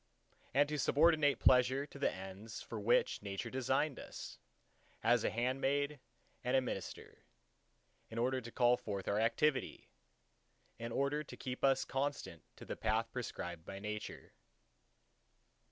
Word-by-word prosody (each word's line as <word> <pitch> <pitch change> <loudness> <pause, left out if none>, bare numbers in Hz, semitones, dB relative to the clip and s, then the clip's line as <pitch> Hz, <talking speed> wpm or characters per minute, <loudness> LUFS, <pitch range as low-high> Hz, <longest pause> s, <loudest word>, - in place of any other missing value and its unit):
and 145 +1 +5
to 150 0 -2
subordinate 150 0 +4
pleasure 130 +2 +4
to 140 - -12
the - - +2
ends 95 +4 -8
for 115 - -6
which 110 +4 +2
Nature 100 -1 -4
designed 130 +3 0
us, - - -8 0.6
as 120 0 +4
a - - +2
handmaid 135 +4 0 0.4
and 125 +1 +3
a - - +6
minister, 110 -8 -5 0.9
in 115 - -7
order 130 +2 +1
to 120 0 -9
call 120 0 +4
forth 100 -5 -5
our 100 - +2
activity; 130 +5 +1 0.9
in 115 0 -4
order 140 +4 0
to - - -10
keep 125 -1 -5
us 135 -1 +4
constant 135 - -2
to - - -11
the - - -4
path 115 +1 0
prescribed 90 -9 -5
by 95 - -7
Nature. 105 +1 -6
125 Hz, 140 wpm, -36 LUFS, 110-140 Hz, 0.9 s, a